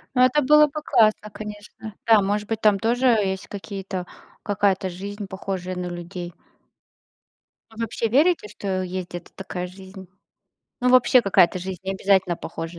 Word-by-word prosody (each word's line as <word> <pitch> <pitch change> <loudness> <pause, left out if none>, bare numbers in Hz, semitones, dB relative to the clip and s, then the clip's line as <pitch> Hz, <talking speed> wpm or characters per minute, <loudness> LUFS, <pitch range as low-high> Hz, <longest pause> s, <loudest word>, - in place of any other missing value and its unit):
Ну 250 - +5
это 295 +4 +4
было 300 +2 +6
бы 300 +1 -6
классно, 215 -4 +3
конечно. 210 0 -9
Да, 225 -2 +6
может 205 +1 -1
быть, 225 -1 -2
там 210 -2 +4
тоже 240 +3 0
есть 195 -5 +1
какие-то 195 -2 -6 0.4
какая-то 195 -2 +1
жизнь, 200 +3 -7
похожая 190 -1 -5
на 180 0 -4
людей. 175 0 -7 1.4
Вы - - -17
вообще 230 0 -2
верите, 295 0 +3
что 190 -3 -3
есть 185 0 -5
где-то 175 -1 -9
такая 180 -2 -5
жизнь? 190 0 -12 0.7
Ну 250 - +2
вообще 255 0 +6
какая-то 185 -4 +3
жизнь, 185 -1 -6
необязательно 190 -2 +1
похожа 165 +1 -7
195 Hz, 150 wpm, -23 LUFS, 185-220 Hz, 1.4 s, было